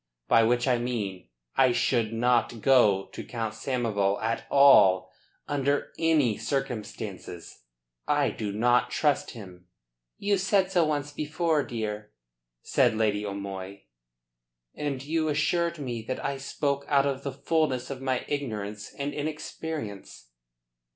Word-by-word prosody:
By 115 - +5
which 120 +3 +2
I 125 -2 +3
mean 105 - -3 0.3
that - - +3
I 130 -2 +5
should 115 -3 +1
not 120 0 +1
go 105 -8 +4
to - - -6
Count 115 -3 -4
Samoval 110 -7 0
at 110 +2 -2
all 95 -10 +6 0.4
under 145 0 0
any 155 -9 +2
circumstances. 105 - -5 0.4
I - - +2
do 105 -2 -4
not 120 +3 +2
trust 145 -3 +1
him." 90 -4 -12 0.5
"You 200 -1 +1
said 195 0 +2
so 175 -4 +3
once 145 -1 -2
before, 155 +1 0
dear," 105 -4 -5 0.5
said 110 - +2
Lady 105 -2 +1
O'Moy. 100 -2 -6 0.9
"And 140 -3 -3
you 160 +2 0
assured 170 +3 +1
me 125 -6 -4
that 130 - -4
I 140 - -1
spoke 140 +1 -2
out 140 -1 +3
of 135 -1 -1
the 140 - -4
fullness 140 -2 -1
of 135 -1 -6
my 130 -2 -1
ignorance 105 -8 -4
and 140 +1 -3
inexperience." 150 - -6
125 Hz, 135 wpm, -27 LUFS, 105-145 Hz, 0.9 s, all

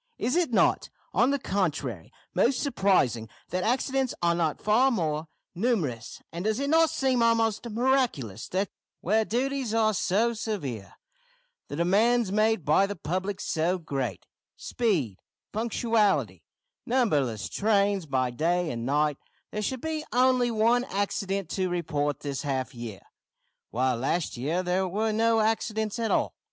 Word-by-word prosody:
Is 255 - 0
it 345 -6 +1
not, - - +2 0.2
on 245 - +4
the 280 - +2
contrary, 150 - -2 0.2
most 250 +1 +2
surprising 180 - +1 0.2
that 180 +1 -1
accidents 260 +2 0
are 170 0 +4
not 165 -3 0
far 230 +6 +4
more 160 - -1 0.3
numerous; 170 - -2
and 170 +2 -5
does 220 +2 +1
it 280 +1 -1
not 325 0 +5
seem 265 -5 +1
almost 230 0 +2
miraculous 230 - 0
that 190 +1 -1 0.3
where 215 +5 +2
duties 255 0 -1
are 215 -1 +3
so 210 +5 +1
severe, 160 - -5 0.7
the - - -6
demands 205 +6 +2
made 215 -3 +2
by 155 +7 +4
the 205 - -4
public 185 +5 -3
so 170 +4 0
great 135 - -4 0.3
speed, 160 - -1 0.3
punctuality, 225 -1 +1 0.4
numberless 145 - +1
trains 200 -4 +1
by 130 -2 0
day 170 +6 0
and 115 0 -4
night 150 +1 +1 0.3
there 210 - -3
should 250 +4 -3
be 315 -1 -3
only 250 0 +3
one 230 +2 +3
accident 195 -2 -2
to 185 -1 0
report 150 -5 -1
this 140 -2 -3
half 135 -3 -2
year, 115 -5 -7 0.7
while 125 +1 0
last 145 +7 -1
half - - -8
year 160 +8 -1
there 185 +1 0
were 215 +4 0
no 225 0 +3
accidents 220 0 -1
at 225 -1 0
all? - - +1
200 Hz, 145 wpm, -27 LUFS, 150-230 Hz, 0.7 s, not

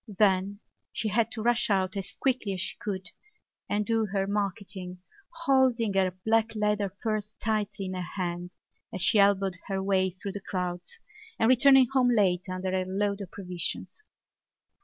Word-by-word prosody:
Then 200 0 +2 0.3
she 220 - -2
had 225 +2 +2
to 220 - -4
rush 240 0 +2
out 190 -2 +1
as 195 -2 -4
quickly 255 -7 0
as 185 - -3
she - - -3
could 190 -3 -4 0.6
and 210 0 0
do 225 -1 +1
her 195 -1 -1
marketing, 195 -2 -3 0.3
holding 265 -9 +2
her 190 -1 +3 0.2
black 225 0 +2
leather 210 -1 +1
purse 215 +1 -3
tightly 210 -3 -1
in 185 - -4
her 185 - -3
hand 175 -1 -4 0.4
as 185 - -5
she 215 +1 +5
elbowed 195 -2 +3
her 195 -1 -2
way 190 -1 +2
through 185 +2 -7
the 205 - -6
crowds 180 -2 -4 0.4
and 225 - +3
returning 265 +1 +7
home 255 -2 +4
late 185 -6 +2
under 185 0 -3
her 185 0 0
load 200 +2 -1
of 195 - -7
provisions. 180 - -5
200 Hz, 165 wpm, -28 LUFS, 185-220 Hz, 0.6 s, returning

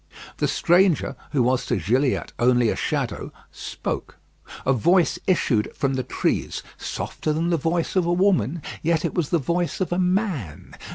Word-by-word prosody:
The - - +1
stranger, 175 -1 +3 0.2
who 135 -5 +2
was 125 +1 +1
to - - +1
Gilliatt 125 - 0
only 120 -1 +4
a - - 0
shadow, - - -2 0.2
spoke. - - -5 0.5
A 135 - +4
voice 170 - +3
issued 130 - +2
from 135 -1 0
the 130 - 0
trees, 125 - -2
softer 155 - -4
than 165 +3 0
the 170 - +3
voice 165 +4 -1
of 180 -2 +2
a - - +2
woman; 175 - +2 0.2
yet 165 -1 +1
it - - -2
was 170 -5 -1
the 170 - +3
voice 170 +4 -1
of 185 - -1
a 175 - +1
man. 180 - -1
160 Hz, 170 wpm, -23 LUFS, 130-175 Hz, 0.5 s, only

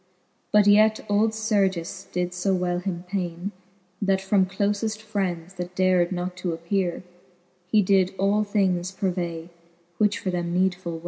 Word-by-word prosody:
But 210 -1 +5
yet 215 +1 +5
old 210 +2 +3
Sergis 200 -6 -1
did 180 0 -1
fb 185 +1 0
well 180 -1 -1
him 180 -2 -4
paine,. 180 0 -3 0.5
That 195 -1 +2
from 195 0 +2
clofe 205 +3 -1
friends, 190 -5 -3
that 180 -1 -6
dar'd 185 -1 +3
not 180 0 -3
to 180 -2 -2
appeare, 175 +1 -1 0.7
He 195 -3 +4
all 200 +2 +2
things 190 -4 +1
did 190 - -17
purvay, 175 -3 -2 0.5
which 210 -1 +3
for 185 - -3
them 175 -1 -2
needful! 180 -3 -1
190 Hz, 145 wpm, -25 LUFS, 180-205 Hz, 0.7 s, But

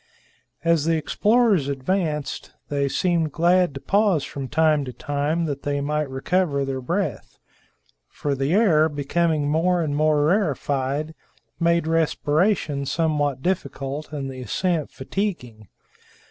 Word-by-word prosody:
As 165 -3 +2
the 165 0 +2
explorers 210 - +2
advanced, 150 +1 -2 0.2
they 140 -1 0
seemed 170 -1 0
glad 175 0 +2
to - - -5
pause 195 -3 +2
from 135 -2 -6
time 155 0 +2
to 125 - -6
time, 145 +6 -1
that 145 -3 -4
they 145 0 -1
might 150 0 -1
recover 140 +1 0
their 135 -1 -3
breath; 180 +9 -3 0.7
for 145 - -3
the 135 +2 -1
air, 170 -6 +4
becoming 150 +1 0
more 170 +3 +2
and 145 -2 -2
more 150 -1 +3
rarefied, 150 - 0 0.5
made 170 -1 +2
respiration 160 -1 +1
somewhat 145 -4 0
difficult 145 -4 -3
and 140 -3 -4
the 130 -1 -8
ascent 160 - -1
fatiguing. 130 - -4
150 Hz, 130 wpm, -23 LUFS, 140-170 Hz, 0.7 s, air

